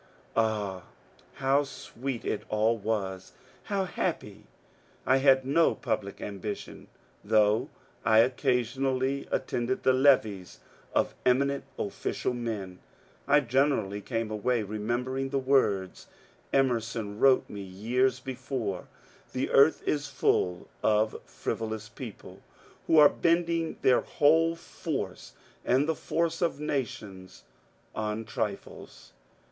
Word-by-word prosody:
Ah, 105 -5 0 0.5
how 135 +2 +2
sweet 135 -2 -6
it 105 - -1
all 110 +2 +2
was, 100 -4 -3 0.3
how 200 -2 0
happy 180 - -3 0.6
I 130 - +4
I - - +5
had 135 -1 +4
no 160 +5 +3
public 105 -5 -3
am 100 -2 -6
bition; 105 -2 -6 0.4
though 110 +5 +3 0.3
I 110 - +4
occasionally 130 +2 0
attended 120 +2 -1
the 130 - +4
levees 120 -9 +2 0.4
of - - +2
eminent 140 +2 +2
official 100 +4 -2
men, 105 -7 -4 0.5
I 145 +1 +5
generaUy 120 -6 +1
came 115 -3 -2
away 110 +2 0
remembering 120 +6 -2
the 140 - -1
words 130 -9 +1 0.4
Emerson 115 -5 0
wrote 135 -1 +5
me 100 - -7
years 120 +7 0
before, 125 -6 -4 0.4
^^ - - -28
The 130 - -2
earth 140 +3 +5
is 145 -1 0
full 90 -1 0
of 110 0 +3 0.2
frivo 110 -1 -4
lous 110 -1 -6
people 115 -1 -10 0.5
who 160 - +4
are 150 -1 +10
bending 170 0 0
their 125 - +5
whole 165 +3 +3
force 165 - -5 0.3
and 135 +4 +2
the 160 - +2
force 165 +1 -1
of 170 -4 0
nations 105 - -5 0.5
on 110 0 -3
trifles." 100 - -6
125 Hz, 120 wpm, -28 LUFS, 105-135 Hz, 0.6 s, are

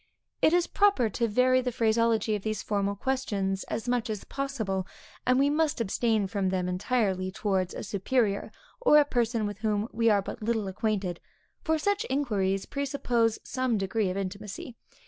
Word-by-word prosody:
It - - +5
is 350 0 +3
proper 395 - +2
to 235 +4 0
vary 255 +4 +3
the 250 0 -2
phraseology 225 -1 +2
of 205 - -4
these 215 -1 -3
formal 200 -1 0
questions, 200 -6 -1
as 225 +2 -4
much 245 -2 0
as 215 -2 -3
possible; 220 -9 -3 0.4
and 255 0 +4
we 275 +1 +4
must 310 -1 +1
abstain 220 0 +1
from 195 -1 -1
them 185 -1 -1
entirely, 190 0 0
towards 190 -2 -1
a - - -5
superior, 205 +1 0 0.3
or - - +6
a 295 - +6
person 235 -4 0
with 205 -1 -5
whom 215 -1 0
we 230 0 +2
are 200 -2 +3
but - - -7
little 220 -2 0
acquainted, 190 -3 -2 0.4
for 320 0 +2
such 405 +7 0
inquiries 200 -8 0
presuppose 250 -5 0
some 255 -3 -1
degree 195 +1 0
of 185 - -3
intimacy. 200 +5 -5
220 Hz, 170 wpm, -28 LUFS, 195-255 Hz, 0.4 s, or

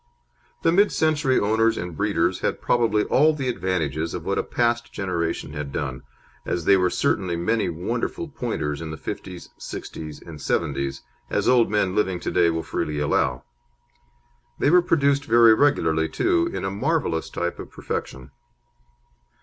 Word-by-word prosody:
The 165 - +4
mid 200 +4 +4
century 150 -4 +2
owners 110 +2 +2
and 90 -1 -5
breeders 95 -2 0
had - - -1
probably 110 -3 +2
all 155 +3 +4
the 135 -3 -3
advantages 85 - -1
of 85 - -6
what 100 - 0
a - - 0
past 120 0 0
generation 85 -5 -3
had 75 -2 -5
done, 65 -1 -4 0.4
as 85 -2 -3
there 100 -1 +5
were 90 0 +2
certainly 90 0 0
many 110 +5 0
wonderful 115 - -3
Pointers 80 - -3
in 80 - -5
the 80 - -6
'fifties, 90 +1 -7
'sixties, 75 -2 -7
and 80 -3 -11
'seventies, 70 -1 -1 0.3
as - - 0
old 125 -2 +4
men 105 -3 +1
living 95 -3 0
to - - -3
day 85 -2 +3
will 80 0 -2
freely 75 -1 -3
allow. 65 -4 0 1.1
They 145 - +2
were 180 +1 +7
produced 140 -5 +2
very 115 -2 +6
regularly, 80 - +2
too, 345 -1 +1
in - - -4
a 95 - -2
marvellous 125 - -1
type 85 0 -3
of - - -8
perfection. 65 +1 -6
95 Hz, 160 wpm, -24 LUFS, 80-125 Hz, 1.1 s, were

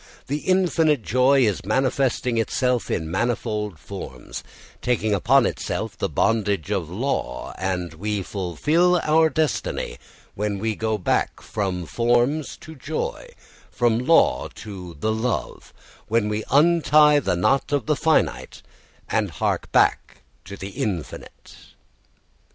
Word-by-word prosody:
The 145 +2 -2
infinite 165 - +2
joy 130 +5 +3
is 105 -5 0
manifesting 125 +2 0
itself 125 +2 0
in 80 -1 -2
manifold 105 -2 -2
forms, 75 -9 -8 0.4
taking 110 -3 0
upon 120 +6 +4
itself - - -3
the - - -2
bondage 105 -5 0
of 95 -6 -1
law, 95 - -3
and 90 -3 -2
we 100 +4 -3
fulfil 150 - +1
our 160 +1 +4
destiny 155 +1 -2 0.3
when 105 0 -2
we 110 +2 -1
go 110 0 -1
back 90 - 0
from 95 -4 -3
forms 120 - +1
to 160 - -10
joy, 160 - -4 0.4
from 120 -2 +1
law 125 - +3
to 95 -6 -9
the 110 +7 0
love, 110 +2 -3 0.4
when 110 -1 +1
we 105 +1 -2
untie 150 -1 +5
the 115 - 0
knot 135 +13 +1
of 140 -6 0
the 150 - +1
finite 160 +2 0 0.4
and - - 0
hark - - -2
back - - +1 0.2
to 100 +1 -8
the 95 - -6
infinite. 95 -5 -5
115 Hz, 130 wpm, -23 LUFS, 100-140 Hz, 0.4 s, untie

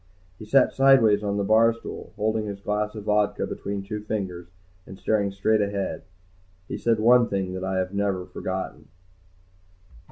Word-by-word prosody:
He 110 - -9
sat 130 +4 +4
sideways 130 -6 +5
on 100 0 -1
the 100 - 0
bar 110 +3 +4
stool, 115 - -9
holding 110 0 -1
his 100 -1 -6
glass 105 +2 -2
of 105 - -7
vodka 105 0 +1
between 100 -1 -5
two 105 +2 -5
fingers 95 -5 -4 0.4
and 95 - -10
staring 100 -1 0
straight 105 +2 +1
ahead. 100 -1 -2 0.7
He - - -4
said 115 -2 +1
one 120 +2 +5
thing 95 -2 -2
that 95 0 -5
I 95 0 -1
had 95 +1 -2
never 100 -2 -1
forgotten. 95 +1 -5
105 Hz, 165 wpm, -25 LUFS, 100-110 Hz, 0.7 s, sideways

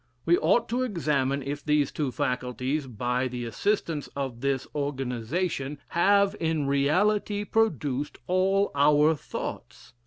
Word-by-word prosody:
We 170 - +5
ought 210 +8 +3
to 245 +3 0
examine 150 - 0
if 145 +1 -4
these 150 -2 +2
two 145 -4 -2
faculties, 130 +1 -2
by 125 +2 -1
the 125 -1 -5
assistance 165 - -1
of 130 -4 -4
this 135 -1 0
organization, 140 +2 -2
have 200 +3 +3
in 160 -3 0
reality 200 +9 +1
produced 150 - 0
all 195 +2 +2
our 150 +2 +4
thoughts. - - -7
145 Hz, 125 wpm, -27 LUFS, 135-185 Hz, -, We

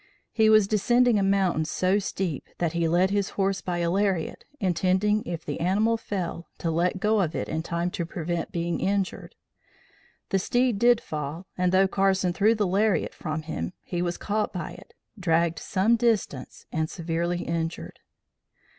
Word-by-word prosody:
He 220 -1 +4
was 215 -2 +6
descending 240 +2 +3
a - - +1
mountain, 195 -4 +2
so 185 +5 +1
steep 185 -6 -3
that 170 -2 -1
he 170 -1 +1
led 180 +4 +3
his 200 -1 0
horse 195 0 +1
by 175 -1 -2
a 170 0 0
lariat, 190 -3 0
intending, 190 +2 +1
if 170 -2 -5
the 145 - -4
animal 205 +6 +2
fell, 185 -6 -4
to 165 - -2
let 175 +3 0
go 210 +1 +2
of 165 -3 -1
it - - -2
in 160 - -2
time 170 +2 -2
to 170 - -3
prevent 170 0 -3
being 170 0 -2
injured. 195 0 -2 0.9
The 195 - +2
steed 245 +1 +1
did 240 0 +5
fall 155 +4 -5
and 180 0 +1
though 190 +1 +4
Carson 190 -2 +1
threw 215 +5 +3
the 210 -2 +1
lariat 200 +2 +1
from 155 -1 -4
him, 90 - -4
he 175 -1 -3
was 175 -1 -1
caught 210 0 -1
by 175 -4 -5
it, - - -14 0.2
dragged 170 -2 +1
some 210 +5 +2
distance 215 - -1
and 160 0 -1
severely 170 +1 -2
injured. 165 0 -4
185 Hz, 175 wpm, -26 LUFS, 170-200 Hz, 0.9 s, was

